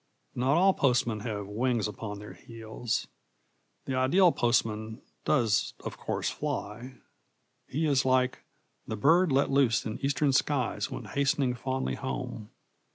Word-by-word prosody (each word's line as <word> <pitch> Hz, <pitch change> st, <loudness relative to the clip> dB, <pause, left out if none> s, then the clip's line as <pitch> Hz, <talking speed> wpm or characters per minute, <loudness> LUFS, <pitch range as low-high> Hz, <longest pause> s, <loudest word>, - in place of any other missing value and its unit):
Not 130 Hz, +5 st, +2 dB
all 190 Hz, +2 st, +5 dB
postmen 120 Hz, -7 st, +1 dB
have 105 Hz, -2 st, -4 dB
wings 115 Hz, +2 st, 0 dB
upon 105 Hz, -1 st, -6 dB
their 105 Hz, +1 st, -9 dB
heels. 115 Hz, 0 st, -4 dB, 0.8 s
The 135 Hz, -, -3 dB
ideal 150 Hz, +8 st, +4 dB
postman 110 Hz, -3 st, 0 dB, 0.3 s
does 115 Hz, -8 st, +2 dB
of -, -, -4 dB
course -, -, -3 dB
fly. 120 Hz, +5 st, -5 dB, 0.7 s
He 155 Hz, +4 st, -1 dB
is 140 Hz, -3 st, +3 dB
like 130 Hz, 0 st, +2 dB, 0.5 s
The 110 Hz, -, -3 dB
bird 170 Hz, -, +4 dB
let 135 Hz, +1 st, +2 dB
loose 135 Hz, -3 st, +3 dB
in 110 Hz, -1 st, -4 dB
eastern 140 Hz, 0 st, +2 dB
skies 130 Hz, -2 st, 0 dB
When -, -, -6 dB
hastening 140 Hz, -2 st, +1 dB
fondly 130 Hz, +2 st, -2 dB
home. 125 Hz, -5 st, -5 dB
125 Hz, 135 wpm, -29 LUFS, 110-140 Hz, 0.8 s, all